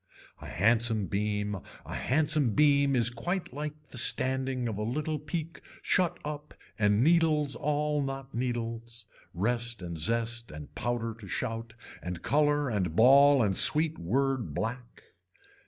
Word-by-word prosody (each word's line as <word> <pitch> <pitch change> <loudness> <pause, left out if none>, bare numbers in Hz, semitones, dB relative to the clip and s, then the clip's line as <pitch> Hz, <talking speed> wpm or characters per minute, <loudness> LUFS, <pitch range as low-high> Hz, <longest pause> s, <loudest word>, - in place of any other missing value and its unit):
A - - -9
handsome 110 +2 +1
beam 105 +1 -2 0.3
a - - -8
handsome 150 -4 0
beam 140 -2 +3
is 120 -1 +4
quite 175 +5 -4
like 150 +1 -5 0.2
the 125 - 0
standing 130 0 +3
of 105 -3 -4
a - - -3
little 150 +7 -3
peak 155 +2 -6 0.2
shut 175 -2 0
up 150 0 -7 0.2
and 105 +1 +2
needles 155 -3 +2
all 150 0 -1
not 135 0 -6
needles. 115 -2 -4 0.3
Rest 120 +2 -1
and 85 -2 -6
zest 115 +5 0
and 75 -1 -11
powder 120 -1 -3
to 100 - -11
shout 115 +2 -5 0.3
and 90 -1 -7
color 145 0 +1
and 95 -8 -2
ball 135 +3 +6
and 100 -3 0
sweet 155 - +6
word 130 +6 -1
black. 120 +1 -5
125 Hz, 140 wpm, -28 LUFS, 110-145 Hz, 0.3 s, ball